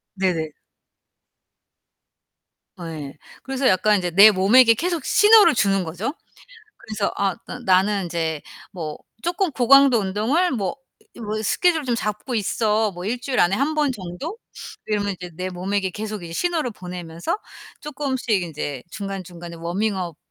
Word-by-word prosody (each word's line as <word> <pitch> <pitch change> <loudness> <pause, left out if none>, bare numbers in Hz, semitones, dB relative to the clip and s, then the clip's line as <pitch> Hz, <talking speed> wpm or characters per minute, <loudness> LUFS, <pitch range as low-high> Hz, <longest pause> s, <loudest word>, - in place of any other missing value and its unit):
네네. 175 -5 -1 2.2
아 170 -2 -7
예. 150 -2 -8 0.3
그래서 270 0 -1
약간 210 +1 +3
이제 180 -2 -2
내 200 +5 +9
몸에게 225 +5 +6
계속 340 +4 -2
신호를 425 - +6
주는 195 -4 +2
거죠. 180 - -4 0.7
그래서 215 -2 -3
아 195 -2 0
'나 - - -7
나는 195 -1 +2
인제 165 -3 -3 0.3
뭐 160 -5 -5 0.3
쪼끔 355 +1 0
고강도 270 0 +6
운동을 220 - +1
뭐 215 0 -2 0.4
이 - - -11
뭐 215 -1 -3
스케줄을 325 - +2
좀 245 -2 0
잡고 215 +3 -3
있어 215 0 +1
뭐 180 -1 -8
1 235 +5 -2
주일 255 0 -3
안에 175 +2 +4
1 280 +8 0
번 295 -3 +2
정도.' 205 - -7 0.5
이러면 205 -1 -1
이제 180 -1 -9
내 185 +2 -3
몸에게 190 +1 -2
계속 215 0 -6
이제 165 - -8
신호를 320 - -1
보내면서 180 - -5 0.4
쪼끔씩 275 -4 -4
인제 145 -5 -5
중간중간에 180 -4 -7
워밍업 180 0 -2
205 Hz, 280 characters per minute, -22 LUFS, 180-255 Hz, 2.2 s, 내